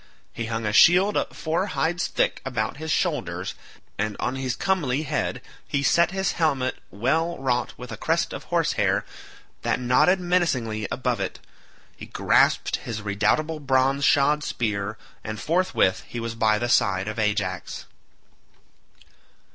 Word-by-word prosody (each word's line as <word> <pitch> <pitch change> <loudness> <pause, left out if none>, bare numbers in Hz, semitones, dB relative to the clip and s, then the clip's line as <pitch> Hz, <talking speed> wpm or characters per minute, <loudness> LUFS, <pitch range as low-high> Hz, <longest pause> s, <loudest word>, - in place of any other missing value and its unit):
He 115 -1 -4
hung 115 -1 -3
a 105 - -1
shield 185 - +6 0.2
four 165 +5 -1
hides 175 +2 0
thick - - 0
about 125 -1 -2
his 160 +1 -4
shoulders, - - -1 0.5
and 105 0 -1
on 125 - -1
his 130 -1 -2
comely 155 -7 0
head 145 - -2 0.2
he 140 -1 -1
set 170 +4 +4
his 190 0 -1
helmet 140 -6 0
well 160 - 0
wrought 125 -2 -1
with 125 0 -9
a - - -6
crest - - 0
of - - -7
horse - - +1
hair - - +1 0.6
that - - 0
nodded 125 +10 +3
menacingly 130 - 0
above 125 -3 -1
it; 95 - -3 0.6
he - - -10
grasped - - +2
his 110 -2 -6
redoubtable 110 +11 0
bronze 135 0 +2
shod 145 +2 +3
spear, 105 -4 -2 0.3
and 110 -1 -5
forthwith 165 - +1
he 120 - -6
was 115 0 -4
by 110 -2 +2
the 120 - -1
side 95 -4 +2
of 110 +1 -4
Ajax. 100 -4 -2
125 Hz, 145 wpm, -24 LUFS, 110-160 Hz, 0.6 s, shield